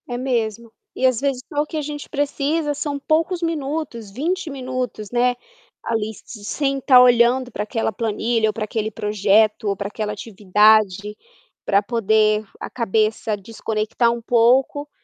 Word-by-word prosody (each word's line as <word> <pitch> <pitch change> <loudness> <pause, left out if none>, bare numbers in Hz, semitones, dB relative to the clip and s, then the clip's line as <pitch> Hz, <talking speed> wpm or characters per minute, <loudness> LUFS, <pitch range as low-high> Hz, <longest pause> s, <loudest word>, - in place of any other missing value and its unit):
É 245 - -3
mesmo, 235 -3 -2 0.2
e 260 - 0
às 255 -3 +3
vezes 275 -3 -1
só 295 -1 +1
o - - -2
que 310 - -6
a - - -1
gente 295 0 -6
precisa 290 +1 -1
são 285 0 -3
poucos 325 +5 0
minutos, 295 -8 -3
20 330 - -2
minutos 255 -6 -4
né, 245 +1 +2 0.5
ali 220 -1 -2
se 210 -3 -11
sem 275 +5 -1
estar 260 -1 +6
olhando 245 +1 +4
para 210 - -3
aquela 225 +1 -2
planilha 225 +1 0
ou - - -2
para 215 - -3
aquele 215 0 -2
projeto 210 +1 +2
ou 200 - -1
para 200 - -3
aquela 210 0 -4
atividade, 210 0 +2 0.5
para 200 0 +3
poder 215 -1 +2 0.2
a - - -6
cabeça 220 -1 0
desconectar 220 +2 -1
um 235 0 -4
pouco, 250 +5 +2
235 Hz, 160 wpm, -21 LUFS, 215-275 Hz, 0.5 s, estar